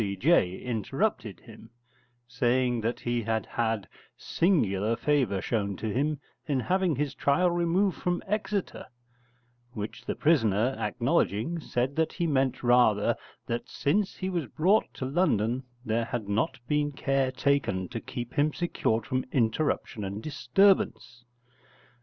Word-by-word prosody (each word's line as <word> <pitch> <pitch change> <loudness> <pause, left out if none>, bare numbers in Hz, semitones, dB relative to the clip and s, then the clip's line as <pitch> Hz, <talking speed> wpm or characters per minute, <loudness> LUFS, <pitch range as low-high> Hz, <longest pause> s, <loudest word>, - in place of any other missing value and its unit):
C.J. 100 - +2
interrupted 120 - -2
him, 110 -1 -14 0.6
saying 125 -1 +1
that 115 +2 -2
he 120 0 -1
had 110 0 -1
had 110 -4 -1 0.3
singular 115 - +1
favour 125 -6 +1
shown 100 -4 -1
to 110 -2 -3
him 145 +3 0 0.3
in 140 -3 +1
having 185 +1 +1
his 140 +1 -2
trial 145 +7 +2
removed 175 +2 +1
from 175 0 -1
Exeter, 210 -1 -2 0.9
which 105 0 -6
the - - -2
prisoner 125 -6 +2
acknowledging, 120 +12 0
said 130 -2 -2
that 160 -1 +1
he 170 - -1
meant 135 -5 0
rather 120 -4 +4 0.3
that 120 0 -4
since 190 +7 0
he 185 - -4
was 170 -7 -2
brought 190 - +2
to 130 - -4
London 130 - +1 0.2
there 115 0 0
had 115 -2 -4
not 100 +2 0
been 150 +1 +1
care 135 -1 0
taken 130 -8 0
to 120 -2 -4
keep 120 -2 -6
him 150 +2 +2
secured 115 -9 -1
from 130 0 -1
interruption 120 -1 0
and 100 +2 -5
disturbance. 145 -5 +1
130 Hz, 135 wpm, -28 LUFS, 110-155 Hz, 0.9 s, rather